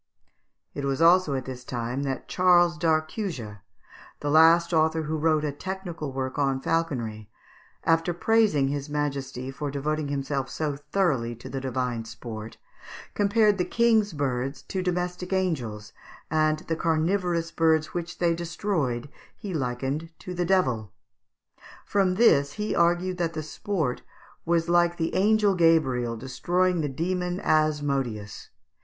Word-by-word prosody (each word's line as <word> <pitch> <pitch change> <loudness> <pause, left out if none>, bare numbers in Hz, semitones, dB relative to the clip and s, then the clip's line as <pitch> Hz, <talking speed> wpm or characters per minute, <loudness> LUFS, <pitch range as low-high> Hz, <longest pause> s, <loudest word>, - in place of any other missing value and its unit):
It 145 - -5
was 135 0 -1
also 170 -3 +5
at 130 -1 -3
this 125 -1 -7
time 120 +2 -3
that 135 -2 -3
Charles 175 -1 +4
d'Arcussia, 155 - -2 0.6
the 145 - -2
last 165 +2 +5
author 160 0 +2
who 155 +1 -2
wrote 155 0 +2
a 150 - -1
technical 175 -2 -5
work 130 +1 -3
on 135 -2 +1
falconry, 125 -10 -2 0.5
after 165 +1 +2
praising 175 -7 +2
his 140 +1 -3
majesty 140 -3 -3
for 145 +1 -4
devoting 150 +2 -2
himself 140 -1 -2
so 150 -3 -2
thoroughly 140 -6 -1
to 120 - -10
the 135 0 -4
divine 125 -3 -2
sport, 110 0 -8 0.6
compared 205 0 +3
the - - +3
King's 225 -1 +2
birds 135 -1 -2
to 190 - -3
domestic 180 0 -2
angels, 120 - -2 0.4
and 155 -1 +2
the 165 - -2
carnivorous 165 +1 0
birds 160 -2 +2
which 175 -1 -4
they 170 -1 +2
destroyed 165 - -2 0.3
he 200 -3 -6
likened 135 +3 -2
to 180 - -7
the 175 0 -1
devil. 125 - +1 0.9
From 190 -3 +1
this 145 -10 +4
he 210 0 -2
argued 175 +2 +2
that 170 -1 -1
the 155 -1 -4
sport 160 - -2 0.4
was 170 0 +1
like 175 0 +3
the 165 -1 -1
angel 210 +1 +3
Gabriel 135 -9 +2
destroying 175 +8 0
the 150 - -1
demon 180 +5 -2
Asmodeus. 140 -9 0
155 Hz, 140 wpm, -26 LUFS, 135-175 Hz, 0.9 s, also